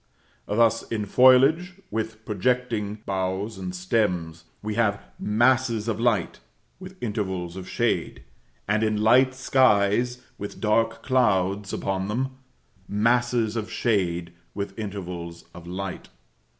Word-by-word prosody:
Thus, 115 +1 +3
in 105 -2 -1
foliage 135 - +5 0.2
with 110 0 -4
projecting 110 -1 -1
boughs 95 +2 -2
or 90 -1 -4
stems, 90 -3 -1 0.2
we 105 0 -2
have 105 -2 +1 0.2
masses 120 0 +2
of 110 -2 -1
light, 115 -7 +1 0.4
with 185 0 -10
intervals 95 -6 -3
of 95 -1 -8
shade; 65 - -1 0.4
and, 105 +1 +2
in 110 -1 +1
light 130 +4 +5
skies 125 -2 +2 0.2
with 100 - -6
dark 115 +1 +1
clouds 100 -6 +1
upon 95 0 -2
them, 130 +5 -2 0.5
masses 115 +1 +1
of 110 -1 -3
shade 90 -7 0 0.2
with 100 -1 -4
intervals 90 -5 -6
of 85 -1 -11
light. 95 +1 -5
105 Hz, 120 wpm, -25 LUFS, 95-120 Hz, 0.5 s, foliage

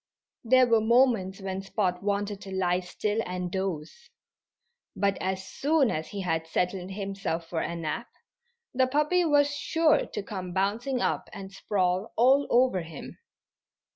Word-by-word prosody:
There 255 +2 +5
were 230 -2 +3
moments 220 -5 +3
when 190 0 -3
Spot 195 -2 -1
wanted 205 0 -2
to 195 - -9
lie 180 -1 +1
still 205 +4 -2
and 180 -1 -4
doze. 190 - -4 0.9
But 200 0 +1
as 190 0 -2
soon 290 -3 +2
as 155 0 -3
he 200 - -5
had 165 -3 -1
settled 180 +2 -1
himself 195 -4 -3
for 165 -1 -2
a 170 - -3
nap 170 +9 -4 0.7
the 260 0 +3
puppy 300 +6 +2
was 290 -2 +3
sure 320 +2 +2
to 210 - -5
come 185 -3 -6
bouncing 225 +7 0
up - - -1
and 195 -1 -8
sprawl 190 0 -1
all 265 +4 +5
over 245 -6 +3
him. 160 -3 -10
195 Hz, 150 wpm, -27 LUFS, 185-245 Hz, 0.9 s, There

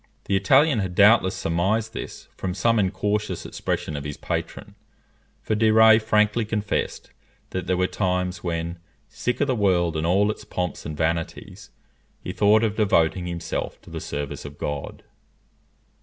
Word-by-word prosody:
The 100 - 0
Italian 135 +7 +4
had 95 -3 -3
doubtless 100 -1 +5
surmised 105 +7 0
this - - -7
from 90 -1 -4
some 115 +2 +2
incautious 105 +2 -1
expression 75 - -3
of 70 - -4
his 75 0 -6
patron, - - -5 0.7
for - - -1
de 110 +1 +3
Rays 110 0 +7
frankly 105 +1 +2
confessed 105 -1 -3 0.4
that 95 0 -4
there 90 0 +1
were 90 - +2
times 90 -2 -1
when, 85 0 -3 0.3
sick 125 0 -3
of - - +4
the 130 - 0
world 90 -7 +1
and 80 +1 -1
all 100 +4 +3
its - - -9
pomps 90 -5 -4
and 75 -1 -6
vanities, 80 +1 -3 0.5
he - - -6
thought 105 +2 +4
of 110 -2 0
devoting 90 -4 +2
himself 85 -1 -4
to - - -14
the - - -5
service 75 -1 -5
of 75 0 -10
God. 75 -1 -5
95 Hz, 160 wpm, -24 LUFS, 85-110 Hz, 0.7 s, Rays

